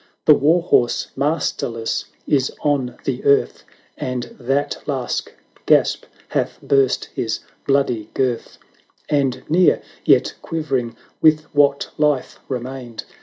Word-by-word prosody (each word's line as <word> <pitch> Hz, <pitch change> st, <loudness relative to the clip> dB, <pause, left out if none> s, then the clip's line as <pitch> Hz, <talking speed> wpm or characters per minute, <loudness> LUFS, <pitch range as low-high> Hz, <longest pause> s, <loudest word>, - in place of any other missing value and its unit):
The 150 Hz, -, +8 dB
war 160 Hz, +5 st, +3 dB
horse 120 Hz, -8 st, +2 dB
masterless 135 Hz, -6 st, -1 dB, 0.2 s
is 135 Hz, -2 st, +2 dB
on 135 Hz, -4 st, 0 dB
the 130 Hz, -2 st, -2 dB
earth, 140 Hz, 0 st, +2 dB, 0.3 s
And 125 Hz, -1 st, -4 dB
that 135 Hz, +3 st, -1 dB
last 135 Hz, -4 st, -2 dB, 0.4 s
gasp -, -, +3 dB, 0.2 s
hath -, -, -1 dB
burst 135 Hz, -2 st, +2 dB
his 110 Hz, -, -2 dB, 0.3 s
bloody 125 Hz, -6 st, +1 dB
girth; 125 Hz, -3 st, -1 dB, 0.5 s
And 140 Hz, -3 st, +1 dB
near, 175 Hz, +3 st, +4 dB, 0.2 s
yet -, -, +4 dB
quivering 135 Hz, -8 st, -2 dB, 0.2 s
with 155 Hz, -1 st, +5 dB
what 140 Hz, -1 st, +3 dB
Hfe 150 Hz, -3 st, +1 dB
remained. 125 Hz, -2 st, -5 dB
135 Hz, 115 wpm, -20 LUFS, 125-145 Hz, 0.5 s, The